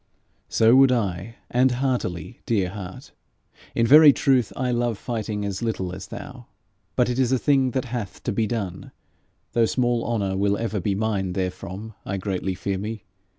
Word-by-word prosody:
'So 115 +2 +5
would 135 0 +7
I 105 -2 -1 0.2
and 125 +1 +3
heartily, 120 - -2
dear 100 -6 +1
heart! 95 -2 -9 0.6
In 115 - +3
very 150 +4 +9
truth 130 -5 +2
I 125 -1 -1
love 120 -2 0
fighting 110 -3 -3
as 100 -2 -3
little 95 -6 -2
as 95 0 -8
thou. 130 -1 -9 0.5
But - - +3
it 125 +1 -1
is 130 -1 +2
a 130 - +4
thing 135 0 +2
that 130 - -1
hath 115 -5 -5
to - - -1
be 110 +2 0
done, 100 -5 -4 0.6
though 115 -1 +3
small 120 -1 +1
honour 100 -5 -1
will 100 +1 +1
ever 110 -2 -2
be 100 +2 -1
mine 100 -3 -1
therefrom, 95 +3 -4
I 100 - -3
greatly 95 -1 -2
fear 95 +1 -3
me. 110 +1 -5
110 Hz, 175 wpm, -24 LUFS, 95-125 Hz, 0.6 s, very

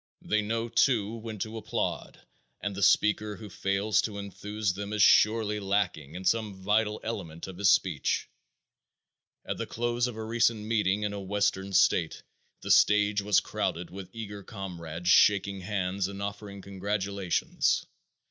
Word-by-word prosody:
They 110 0 +1
know, 115 +2 -2
too, 115 -3 +2
when 110 -1 -7
to 110 +3 -4
applaud, 110 - -3 0.4
and 100 - -3
the 100 - -5
speaker 105 +1 +3
who 105 -1 -10
fails 100 +3 +1
to 105 -2 -4
enthuse 100 0 -3
them 100 +2 -5
is 105 -1 +3
surely 110 -1 +4
lacking 95 -7 -1
in 95 +1 -7
some 110 -2 +1
vital 105 +3 0
element 85 -8 -5
of 95 -1 -9
his 100 -1 +4
speech. 85 -7 +1 1.2
At - - -3
the - - -3
close 120 +1 -1
of 120 - -6
a 110 - -5
recent 115 -1 +2
meeting 105 -2 +1
in 105 -1 -1
a 100 - -4
western 100 0 -1
state 90 -3 +2 0.4
the - - -2
stage 105 0 +4
was 105 0 +4
crowded 85 +1 -3
with 95 -1 -8
eager 105 -2 -7
comrades 90 -4 -7
shaking 100 -1 +4
hands 95 -1 -1
and 100 0 -7
offering 100 -1 -6
congratulations. 100 -1 -1
100 Hz, 155 wpm, -28 LUFS, 95-110 Hz, 1.2 s, surely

